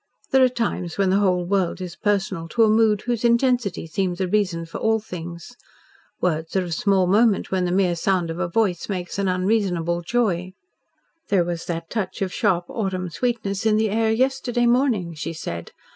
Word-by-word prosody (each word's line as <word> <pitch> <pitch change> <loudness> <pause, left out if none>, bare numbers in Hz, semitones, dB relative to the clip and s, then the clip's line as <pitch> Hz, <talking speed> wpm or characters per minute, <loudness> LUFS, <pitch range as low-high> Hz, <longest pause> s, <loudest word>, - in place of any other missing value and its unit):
There 265 -1 +5
are 255 - +5
times 230 -8 -3
when 195 -2 +2
the 195 - +3
whole 180 -3 +2
world 190 -1 0
is 180 -2 -6
personal 195 -5 -1
to 230 +7 +2
a 220 - +5
mood 215 -2 +3
whose 240 -2 -2
intensity 235 -6 +2
seems 175 +2 -2
a 190 - 0
reason 180 -4 0
for 165 - -7
all 220 0 +2
things. 175 +1 -8 0.6
Words 160 -1 -1
are 190 - +2
of 175 -2 -4
small 190 +2 +2
moment 210 +3 +3
when 185 -1 +1
the 175 - -1
mere 180 -2 +2
sound 175 -1 0
of 165 - -6
a 185 - 0
voice 185 -1 0
makes 185 -1 -4
an 200 - +1
unreasonable 185 -3 0
joy. 185 -3 -1 0.8
"There 195 -3 +3
was 170 -1 -4
that 165 -1 -5
touch 195 -4 -2
of 185 - -4
sharp 180 -5 +1
autumn 185 -5 -3
sweetness 200 +1 -2
in 215 -1 +3
the 220 -1 +1
air 220 +1 +2
yesterday 245 0 +1
morning," 235 -8 +2
she 165 +2 -5
said. 85 - -6
190 Hz, 190 wpm, -23 LUFS, 175-220 Hz, 0.8 s, There